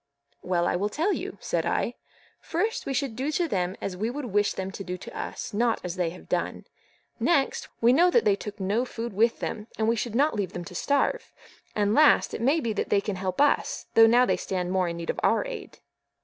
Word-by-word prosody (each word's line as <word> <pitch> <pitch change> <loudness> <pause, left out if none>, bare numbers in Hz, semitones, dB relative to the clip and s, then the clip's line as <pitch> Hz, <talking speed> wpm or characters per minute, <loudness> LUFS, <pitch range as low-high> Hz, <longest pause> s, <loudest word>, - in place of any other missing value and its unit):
"Well, 175 -1 0
I - - +1
will 200 +4 0
tell 330 - 0
you," - - -5
said - - -1
I. - - 0 0.5
"First, 450 +1 -2
we 275 - -1
should 265 -4 -1
do 270 +5 -2
to 345 +2 +1
them 185 - -1
as 190 - -4
we 215 +5 -2
would 280 +3 -4
wish 205 -2 +1
them 190 0 -4
to 195 - -7
do 180 -1 -4
to - - -10
us, - - -5
not 230 +2 +1
as 180 -1 -4
they 180 -3 0
have 180 - -12
done; - - -2 0.5
next, 280 -6 +1
we 235 +2 +6
know 345 +6 +5
that 465 +6 +3
they 200 - +4
took 210 +1 -8
no 200 +5 +1
food 235 -3 -5
with 225 +4 +2
them, 210 -1 -4
and 220 - +1
we 230 - +3
should 230 0 -3
not 290 +5 +3
leave 200 -4 -2
them 175 - -5
to 180 - -10
starve; 285 - 0 0.4
and 205 0 +2
last, 300 +4 +5
it - - -4
may 275 +7 +3
be 230 -6 -1
that - - -2
they 200 - +4
can 200 -1 -3
help 185 -1 -3
us, 290 0 +2
though 225 0 +8
now 245 +2 +5
they - - +1
stand 180 -2 -3
more 185 -1 +1
in 170 0 -4
need 170 -1 -2
of - - -7
our - - +2
aid." - - -7
220 Hz, 240 wpm, -26 LUFS, 190-265 Hz, 0.5 s, though